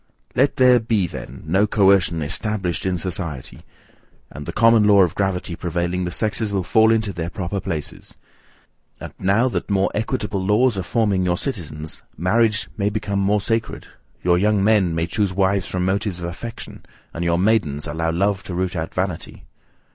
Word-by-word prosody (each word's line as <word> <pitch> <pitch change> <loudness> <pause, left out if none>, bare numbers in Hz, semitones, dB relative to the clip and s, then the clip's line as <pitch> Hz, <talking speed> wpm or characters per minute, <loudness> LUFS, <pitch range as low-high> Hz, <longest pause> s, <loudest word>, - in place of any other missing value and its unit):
Let 135 +2 +3
there 125 -1 +5
be 110 -4 0
then 65 -5 -8
no 95 +6 +2
coercion 95 -6 +3
ESTABLISHED 90 +1 -2
in 90 -1 0
society, 85 -7 -4 0.7
and 75 0 -9
the - - -2
common 115 -1 +4
law 100 -2 +6
of 85 - 0
gravity 95 -3 -2
prevailing, 85 +2 -2
the - - -2
sexes 110 +2 -2
will 95 -2 0
fall 110 +5 +4
into 110 -3 0
their 85 -1 -4
proper 95 0 -4
places. 85 -6 -6 0.8
And, - - -8
now 100 +7 +2
that - - -3
more 95 -1 +1
equitable 105 -2 -2
laws 110 +5 +3
are 95 - -2
forming 100 0 0
your 90 -1 +1
citizens, 80 - -5 0.2
marriage 110 +3 +2
may 100 +1 +1
become 100 -1 -2
more 100 +1 +2
sacred; 115 +1 -2 0.4
your 90 0 +3
young 105 0 +2
men 100 -5 +3
may 80 0 0
choose 100 +2 -1
wives 95 0 +1
from 90 -1 -2
motives 100 0 -1
of 85 - -6
affection, 115 +7 -8 0.3
and 85 - -4
your 85 0 +1
maidens 90 -8 +1
allow 80 +2 -2
love 100 +3 0
to 90 - -5
root 95 +1 -2
out 80 -1 -4
vanity. 90 -3 -4
95 Hz, 175 wpm, -21 LUFS, 85-105 Hz, 0.8 s, law